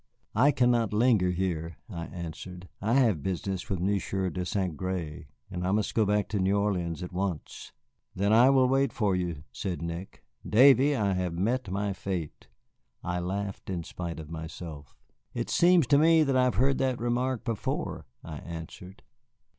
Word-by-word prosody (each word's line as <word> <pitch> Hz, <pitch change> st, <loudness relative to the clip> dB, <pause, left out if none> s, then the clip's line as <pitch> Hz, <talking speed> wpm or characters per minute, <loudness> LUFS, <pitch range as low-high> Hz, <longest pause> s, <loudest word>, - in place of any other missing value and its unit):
"I 130 Hz, +6 st, +5 dB
cannot 120 Hz, -6 st, +2 dB
linger 110 Hz, -4 st, +3 dB
here," 85 Hz, -3 st, -2 dB
I 85 Hz, -7 st, -6 dB
answered; 90 Hz, +1 st, -8 dB
"I 110 Hz, +4 st, +1 dB
have 115 Hz, -, +3 dB
business 95 Hz, +2 st, -3 dB
with 95 Hz, -4 st, -1 dB
Monsieur 95 Hz, 0 st, -1 dB
de 90 Hz, +4 st, -3 dB
Saint 95 Hz, -3 st, -1 dB
Gré, 90 Hz, -4 st, -4 dB, 0.2 s
and 90 Hz, -1 st, -4 dB
I 90 Hz, -, 0 dB
must 105 Hz, +1 st, 0 dB
go 110 Hz, -3 st, +2 dB
back 105 Hz, 0 st, +1 dB
to 105 Hz, -, -1 dB
New 95 Hz, +2 st, +2 dB
Orleans 90 Hz, -5 st, -1 dB
at 90 Hz, -, -7 dB
once." 90 Hz, -4 st, -4 dB, 0.4 s
"Then 100 Hz, +3 st, +2 dB
I 120 Hz, +4 st, +7 dB
will 130 Hz, -2 st, +5 dB
wait 135 Hz, 0 st, +2 dB
for 100 Hz, -4 st, +1 dB
you," 85 Hz, -5 st, -3 dB
said 90 Hz, -4 st, -4 dB
Nick. 85 Hz, +3 st, -6 dB, 0.2 s
"Davy, 135 Hz, +4 st, +6 dB
I 100 Hz, -6 st, +1 dB
have 90 Hz, -2 st, -1 dB
met 110 Hz, +5 st, 0 dB
my 100 Hz, +1 st, -1 dB
fate." 90 Hz, -4 st, -5 dB, 0.6 s
I 90 Hz, 0 st, -2 dB
laughed 100 Hz, +3 st, -4 dB
in 90 Hz, -3 st, -3 dB
spite 85 Hz, 0 st, -6 dB
of 80 Hz, 0 st, -9 dB
myself. 80 Hz, -3 st, -8 dB, 0.4 s
"It -, -, -3 dB
seems 175 Hz, -3 st, +5 dB
to 140 Hz, +3 st, +4 dB
me 160 Hz, 0 st, +5 dB
that 135 Hz, -3 st, +1 dB
I 130 Hz, 0 st, +4 dB
have 125 Hz, -, +1 dB
heard 135 Hz, +2 st, +2 dB
that 130 Hz, -2 st, +1 dB
remark 120 Hz, +1 st, -1 dB
before," 115 Hz, -, -3 dB, 0.2 s
I 80 Hz, -2 st, -7 dB
answered. 85 Hz, +3 st, -9 dB
95 Hz, 175 wpm, -28 LUFS, 90-120 Hz, 0.6 s, I